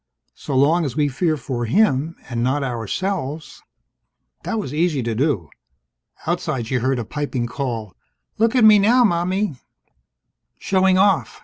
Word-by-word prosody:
So 140 - -5
long 160 +6 +3
as 135 -6 -3
we 150 -1 +2
fear 155 +4 0
for 120 -3 -4
him, 160 - +1
and 120 -2 -3
not 135 +4 0
ourselves 145 - -4 0.4
" - - -50
That 225 - -3
was 195 -11 -4
easy 155 -4 0
to 115 0 -2
do. 110 - -1 0.7
Outside, 120 -4 -2
she 125 +3 -1
heard 130 +2 0
a 120 - -4
piping 140 -2 -3
call: 120 -5 -4 0.4
"Look 225 +2 +2
at 250 - +4
me 215 -1 +8
now, 240 +5 +4
Mommie!" 185 - 0 1.0
"Showing 190 -1 +2
off!" 195 +1 +2
145 Hz, 150 wpm, -21 LUFS, 125-190 Hz, 1.0 s, me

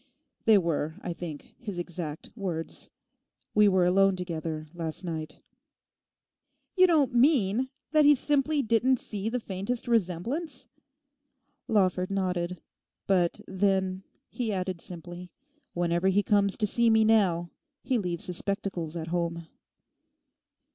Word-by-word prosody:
They 220 -2 +7
were, 160 -3 -1
I 175 - -3
think, 165 -4 -8
his 205 -6 -6
exact 175 -3 -5
words. 175 -7 -4 0.6
We 210 0 +6
were 185 -2 +4
alone 195 +2 +4
together, 165 -3 -4
last 165 0 -4
night.' 160 -3 -6 1.3
'You 370 -1 +6
don't 295 -7 +3
mean 245 -2 +3 0.2
that 305 -1 +5
he 295 0 +7
simply 290 +1 +1
didn't 235 +3 +2
see 210 0 -4
the 250 +2 -1
faintest 215 +4 -4
resemblance?' 230 - -1 1.0
Lawford 185 -4 +2
nodded. 180 -3 -2 0.4
'But 180 -3 +1
then,' 190 -1 0 0.3
he 235 -3 -2
added 185 -3 -3
simply, 175 0 -9 0.4
'whenever 175 +1 +1
he 195 +2 +3
comes 200 -1 +2
to 215 - +1
see 235 +3 +3
me 220 0 +5
now 185 -6 +3 0.3
he 250 -1 +1
leaves 180 0 -3
his 180 -2 -3
spectacles 190 -5 -3
at 165 -1 -4
home. 170 -1 -2
190 Hz, 125 wpm, -28 LUFS, 175-225 Hz, 1.3 s, They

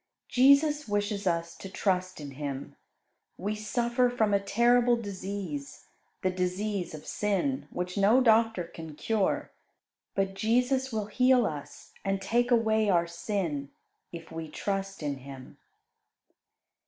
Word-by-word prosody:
Jesus 285 +3 +5
wishes 205 -1 -1
us 170 -1 -1
to 195 - -8
trust 185 -2 -1
in 145 -2 -7
Him. 140 -1 -5 0.6
We 205 +3 -2
suffer 235 +4 +1
from 220 -4 +1
a 200 - +4
terrible 240 +4 +3
disease 195 -8 -5 0.4
the 185 - +2
disease 185 0 -2
of 150 - -10
sin, 210 +7 -1
which 180 +2 -3
no 210 +6 +5
doctor 225 -5 +4
can 160 -2 -9
cure; 215 +3 0 0.6
but 195 -1 0
Jesus 250 +5 +1
will 215 -2 -1
heal 250 +3 +4
us 145 -4 -7
and 195 0 0
take 240 +5 +1
away 220 -3 +3
our 170 -3 +3
sin 170 -5 -3 0.4
if 165 -1 -9
we 160 0 -5
trust 195 +1 -3
in 145 -2 -2
Him. 135 0 -11
200 Hz, 130 wpm, -29 LUFS, 170-230 Hz, 0.6 s, Jesus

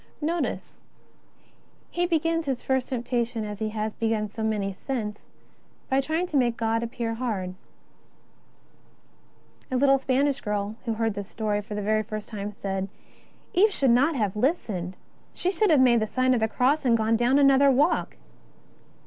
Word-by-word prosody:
!N^otice 330 +2 -2
how - - -35 0.4
he 350 0 0
begins 330 -1 0
his 265 -3 -2
first 265 -1 0
temptation 240 -2 -2
as 210 -1 -6
he 220 -1 -1
has 215 0 -3
begun 225 -2 -1
so 220 +2 -8
many 210 -3 -1
since, 210 -1 -5 0.6
by 265 +1 +3
trying 315 +5 -1
to 310 -5 -1
make 240 -3 +2
God 225 0 0
appear 235 -1 -3
hard. 215 -7 -3 2.2
A 255 - 0
little 275 +1 +4
Spanish 270 +1 +1
girl 210 0 -2
who 230 - 0
heard 225 -1 0
this 200 -1 -6
story 210 -2 -1
for 210 0 -7
the 215 +1 +1
first 215 0 -6
time 210 -1 -5
said: 195 -2 -3
'^ - - -13 0.6
Eve 415 +4 +5
should 270 -9 +2
not 280 +7 +3
have 210 -6 -1
listened; 210 - -1 0.4
she 365 - 0
should 420 +1 +2
have 305 -4 +5
made 245 -2 +5
the 215 - -1
sign 255 +3 +2
of 245 - +2
the 220 - +2
Cross 265 +7 +1
and 235 -3 +4
gone 220 +1 +2
down 240 +4 +3
another 275 0 +6
walk." 285 +5 +2
235 Hz, 170 wpm, -26 LUFS, 215-275 Hz, 2.2 s, another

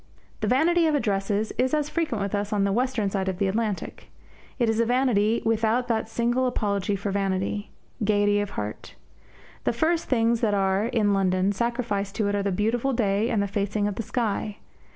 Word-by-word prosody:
The - - -1
vanity 330 +6 +3
of 310 - +2
addresses 205 -3 0
is 260 +3 +2
as 300 -1 0
frequent 300 -11 -1
with 200 - -4
us 205 0 0
as - - -3
on 205 -1 +2
the 200 - +1
western 235 -2 0
side 190 -1 -1
of 185 - -3
the 200 - +1
Atlantic. 210 0 -3 0.5
It 240 -3 +2
is 225 0 +1
a 230 - +3
vanity 235 -3 +2
without 225 +2 +1
that 225 -1 0
single 240 +3 +1
apology 205 -4 -1
for 200 +1 -3
vanity 195 +1 -1 0.3
gaiety 205 0 +3
of 205 -1 -2
heart. 105 0 -5 0.7
The - - +1
first 325 +7 +1
things 230 -2 +2
that 210 -3 +2
are, 195 +2 +1
in 220 -4 +1
London, 190 0 +2
sacrificed 210 -2 -2
to 215 - 0
it - - -1
are 200 - 0
the 200 0 -1
beautiful 230 +7 0
day 215 -1 +1
and 210 -4 +1
the - - -1
facing 205 +1 -1
of 205 - -2
the 210 - -4
sky. 215 -2 -2
210 Hz, 200 wpm, -25 LUFS, 200-235 Hz, 0.7 s, vanity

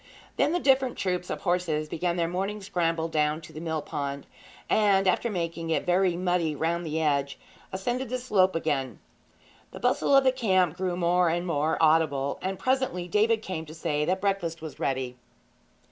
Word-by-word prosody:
Then - - +2
the 355 - +1
different 265 -4 +2
troops 180 -1 -2
of - - -4
horses 175 -4 0
began 170 +3 -1
their 170 -1 0
morning 195 +4 -2
scramble 165 -4 -1
down 150 -1 0
to 160 - -13
the 155 - -7
mill 160 -2 -2
pond, 140 -1 -4 0.4
and, 195 -3 +3
after 185 +6 +2
making 165 -4 -3
it 160 - 0
very 180 0 +2
muddy 175 -4 0
round 170 +3 -1
the 155 +1 -1
edge, 140 -3 0 0.3
ascended 240 +7 -2
the 255 - -1
slope 200 -8 +2
again. 145 -5 -1 0.7
The - - -10
bustle 280 - +2
of 275 - +6
the 260 - +4
camp 185 - +2
grew 180 -1 -2
more 175 0 +3
and 175 +2 -1
more 155 -2 0
audible, 155 -4 +2
and 190 +1 -3
presently 255 -9 0
David 220 +4 +2
came 160 -5 -5
to 155 - -10
say 155 -2 -1
that 185 +3 0
breakfast 195 -5 -1
was 160 -2 -9
ready. 130 -2 -2
175 Hz, 180 wpm, -27 LUFS, 160-195 Hz, 0.7 s, of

